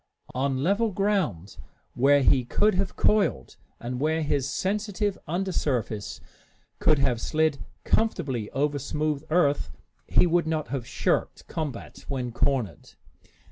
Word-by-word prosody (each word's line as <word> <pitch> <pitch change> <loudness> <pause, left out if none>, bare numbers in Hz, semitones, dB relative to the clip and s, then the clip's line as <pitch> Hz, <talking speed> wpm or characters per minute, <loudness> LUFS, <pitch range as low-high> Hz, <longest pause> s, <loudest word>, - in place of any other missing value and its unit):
On 130 +1 0
level 205 +6 +2
ground, 190 - -1 0.4
where 140 +2 +4
he 130 -1 +4
could 210 - +2
have 190 +1 -1
coiled, 200 - +1 0.2
and 125 +1 -4
where 160 +2 +1
his 140 -2 0
sensitive 205 +2 -1
under 185 +4 -1
surface 115 - -2 0.6
could 155 - +4
have 130 -4 +1
slid 155 -3 +1 0.2
comfortably 140 - 0
over 145 +1 0
smooth 150 +1 -2
earth, 155 -3 +2 0.4
he - - +4
would 170 -1 +2
not 155 -1 -1
have 130 -3 -3
shirked - - -1
combat 150 -7 -5
when 130 -3 -3
cornered. 125 - -1
145 Hz, 130 wpm, -26 LUFS, 130-180 Hz, 0.6 s, where